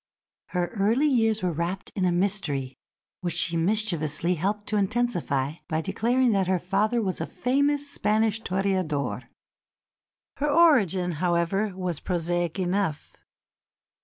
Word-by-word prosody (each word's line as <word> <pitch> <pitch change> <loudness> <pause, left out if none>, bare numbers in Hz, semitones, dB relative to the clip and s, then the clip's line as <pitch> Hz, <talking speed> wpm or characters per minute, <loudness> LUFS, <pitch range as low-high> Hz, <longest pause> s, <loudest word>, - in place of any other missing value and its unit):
Her 180 -1 -1
early 225 +6 +1
years 225 -7 +2
were 180 - +1
wrapped 170 +4 -3
in 190 - 0
a 180 - +2
mystery 175 -8 -1 0.5
which 175 -3 -3
she 175 -1 +2
mischievously 170 -3 0
helped 200 +5 -2
to 210 - +1
intensify 180 - 0
by 155 0 0
declaring 235 +7 +1
that 195 -3 +1
her 185 0 +2
father 210 +6 0
was 185 -2 -2
a - - -2
famous 285 +3 0
Spanish 220 -4 +1
toreador. 180 - -1 1.1
Her 295 +1 0
origin, 225 - +4
however, 180 +3 0
was 180 -4 -2
prosaic 175 -1 -1
enough. 185 -4 -1
190 Hz, 130 wpm, -26 LUFS, 170-220 Hz, 1.1 s, origin